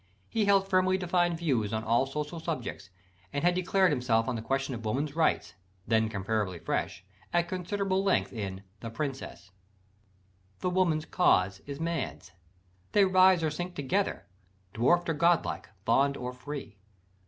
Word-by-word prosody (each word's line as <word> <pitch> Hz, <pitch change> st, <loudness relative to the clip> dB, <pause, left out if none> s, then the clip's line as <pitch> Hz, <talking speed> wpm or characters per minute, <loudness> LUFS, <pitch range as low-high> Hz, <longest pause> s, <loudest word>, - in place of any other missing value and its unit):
He 220 Hz, -2 st, 0 dB
held 195 Hz, -1 st, +4 dB
firmly 185 Hz, -1 st, +3 dB
defined 175 Hz, -2 st, +1 dB
views 130 Hz, -11 st, 0 dB
on 110 Hz, 0 st, -2 dB
all 120 Hz, +4 st, +2 dB
social 150 Hz, +4 st, -4 dB
subjects; 130 Hz, -, -5 dB, 0.4 s
and 145 Hz, -, -2 dB
had 175 Hz, 0 st, +4 dB
declared 185 Hz, +1 st, +2 dB
himself 115 Hz, -3 st, +1 dB
on 130 Hz, -, -1 dB
the 115 Hz, -, -3 dB
question 135 Hz, +3 st, -1 dB
of 115 Hz, -2 st, -6 dB
"Woman's 140 Hz, +7 st, -2 dB
Rights" 165 Hz, -1 st, +1 dB, 0.3 s
then 110 Hz, 0 st, +2 dB
comparatively 100 Hz, -2 st, -2 dB
fresh -, -, -3 dB, 0.3 s
at 175 Hz, 0 st, +2 dB
considerable 190 Hz, +2 st, -1 dB
length 195 Hz, -1 st, +1 dB
in 100 Hz, -4 st, -5 dB, 0.2 s
The 115 Hz, -, -6 dB
Princess. 130 Hz, -5 st, -5 dB, 1.1 s
"The 180 Hz, -, 0 dB
woman's 170 Hz, -4 st, +1 dB
cause 95 Hz, -, +2 dB
is 140 Hz, 0 st, -6 dB
man's: 90 Hz, -, -3 dB, 0.6 s
they 205 Hz, -1 st, +6 dB
rise 185 Hz, -2 st, +5 dB
or 155 Hz, -, +1 dB
sink 175 Hz, +4 st, -5 dB
Together, 190 Hz, +9 st, -1 dB, 0.5 s
dwarf'd 170 Hz, +10 st, +3 dB
or 165 Hz, -, +1 dB
god 170 Hz, +2 st, +3 dB
like, -, -, -5 dB, 0.2 s
bond 140 Hz, +4 st, +3 dB
or 125 Hz, 0 st, -5 dB
free. 125 Hz, -5 st, -8 dB
150 Hz, 155 wpm, -29 LUFS, 115-180 Hz, 1.1 s, they